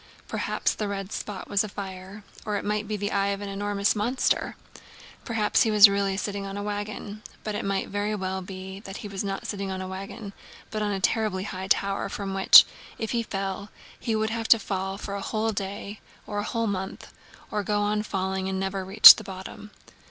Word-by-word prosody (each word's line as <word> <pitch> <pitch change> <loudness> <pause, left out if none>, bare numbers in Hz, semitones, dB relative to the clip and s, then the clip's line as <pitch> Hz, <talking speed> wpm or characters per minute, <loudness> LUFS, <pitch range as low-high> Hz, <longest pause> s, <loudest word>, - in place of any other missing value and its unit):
Perhaps - - -1
the 210 - -3
red 195 0 -5
spot 205 -3 -5
was 200 0 +2
a 215 - -5
fire, 195 +1 -8 0.2
or 210 -2 -2
it - - -5
might 210 0 -1
be 210 0 -2
the 205 0 -3
eye 200 0 +1
of 200 0 -1
an 200 - -5
enormous 200 +1 0
monster. 235 +5 0 0.7
Perhaps 220 -3 +1
he 225 - +3
was 210 -1 +9
really 200 -1 0
sitting 200 -1 -3
on 195 0 -6
a 205 - -4
wagon, 205 0 -5 0.2
but 215 - -3
it 205 - -3
might 195 -1 -1
very 205 +1 -2
well 190 -1 -3
be 190 +1 -8
that 195 -1 -8
he - - -3
was 200 -1 -4
not 195 -1 -4
sitting 200 -2 -4
on 190 0 -4
a 185 - -5
wagon 195 +2 -7 0.4
but 215 - -3
on 210 - 0
a 195 - -2
terribly 200 -1 0
high 190 -1 -5
tower 195 +1 +1
from 195 -1 -4
which, 195 0 +9 0.3
if 220 - -3
he 235 - +1
fell, 195 -1 -4 0.3
he 225 - -1
would 220 0 0
have 225 0 -3
to 230 - +7
fall 195 -2 -3
for 200 0 -6
a 200 - -4
whole 220 +1 -1
day 200 +1 -5 0.3
or 205 -1 -3
a - - -1
whole 230 -1 -1
month, 190 -2 -4 0.4
or 210 - 0
go 205 +1 0
on 210 +1 +1
falling 190 -2 -2
and 190 0 -2
never 195 0 -2
reach 195 +3 +10
the - - -7
bottom. 190 +2 -9
200 Hz, 215 wpm, -26 LUFS, 195-210 Hz, 0.7 s, reach